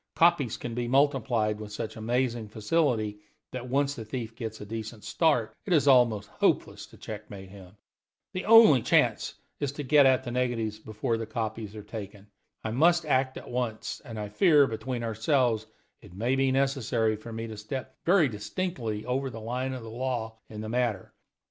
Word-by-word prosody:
Copies 165 -8 +3
can 120 - -5
be 120 0 -2
multiplied 125 -5 +2
with 105 -1 -8
such 110 +1 -5
amazing 120 0 -1
facility 110 -1 0 0.3
that, 125 -1 -6
once 140 +2 +1
the 115 - -7
thief 115 0 -5
gets 110 -2 -6
a - - -7
decent 110 0 -6
start, 145 -8 +1
it 185 - -1
is 150 -3 +3
almost 120 -6 +4
hopeless - - 0
to - - -17
checkmate 100 -3 -8
him. 95 0 -14 0.6
The 185 - -3
only 225 - +8
chance - - +2 0.2
is 145 -2 -1
to 145 - -5
get 145 0 +6
at 130 -1 +3
the 120 - -5
negatives 120 -4 -1
before 110 +1 -2
copies 110 -2 -4
are 105 - -8
taken. 105 -2 -8 0.4
I 110 - -2
must 170 +7 +3
act 130 -2 +1
at - - -9
once; 120 -3 -3
and 115 -5 -7
I 105 -1 -4
fear, 150 - +5
between 120 0 -4
ourselves, 115 0 +1 0.3
it 100 -4 -14
may 120 +6 0
be 135 0 +2
necessary 130 -5 +1
for 110 +2 -10
me 115 0 -4
to 110 -1 -7
step 130 +5 -6
very 175 -3 +5
distinctly 115 - -4
over 130 +2 -1
the 115 -2 -8
line 125 +4 -3
of 125 -3 -6
the 110 - -8
law 115 -2 -3
in 105 -1 -7
the 110 - -5
matter. 120 -5 -1
120 Hz, 180 wpm, -28 LUFS, 110-135 Hz, 0.6 s, only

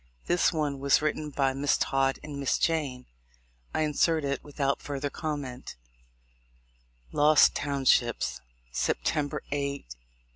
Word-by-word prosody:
This 175 - +3
one 150 -4 -1
was 140 0 +4
written 155 0 -2
by 135 -2 +1
Miss 140 +2 +1
Todd 135 0 +1
and 145 -2 -6
Miss 140 - +1
Jayne. 145 -6 -1 0.7
I - - -1
insert 155 +1 +2
it 140 -1 -2
without 140 -1 -1
further 140 0 -4
comment: 145 -6 -5 1.4
Lost 150 +1 +5
Townships, 120 - +1 0.3
September 145 - -1
8, 145 0 0
1842. 140 - -5
140 Hz, 120 wpm, -28 LUFS, 135-150 Hz, 1.4 s, Lost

